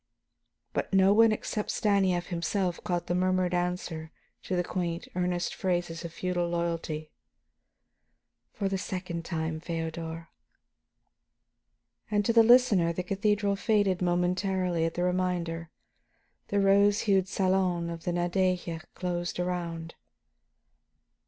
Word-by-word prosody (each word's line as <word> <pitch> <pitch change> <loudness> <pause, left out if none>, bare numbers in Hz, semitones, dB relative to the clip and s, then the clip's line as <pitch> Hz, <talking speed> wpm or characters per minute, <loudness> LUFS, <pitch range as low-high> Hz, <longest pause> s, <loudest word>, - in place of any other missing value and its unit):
But - - -2
no 195 0 +5
one 225 +1 +6
except 215 0 -3
Stanief 190 -4 +1
himself 175 +1 -1
caught 175 -1 -1
the - - -1
murmured 185 0 +1
answer 175 -3 -2 0.3
to 185 - -3
the 180 - +1
quaint, 175 -2 -3
earnest 180 -1 -1
phrases 175 -3 -2
of 170 - -6
feudal 175 0 -1
loyalty: 165 -2 -3 1.4
"For 200 - -2
the 195 0 -1
second 180 -4 -4
time, 160 -2 -2
Feodor." 165 0 -5 1.8
And 205 -1 +1
to 230 - +2
the 230 - +8
listener 225 -7 +5
the 180 +2 -3
cathedral 200 +1 +1
faded 200 -3 +1
momentarily 180 0 +1
at 165 - -2
the 175 - 0
reminder; 180 -2 -1 0.8
the 205 - +1
rose 200 +1 +4
hued 195 -3 +2
salon 185 -3 +1
of 165 -1 -7
the 175 - -1
Nadeja 175 -1 0
closed 175 -1 -3
around. 170 -2 -3
180 Hz, 120 wpm, -29 LUFS, 170-195 Hz, 1.8 s, the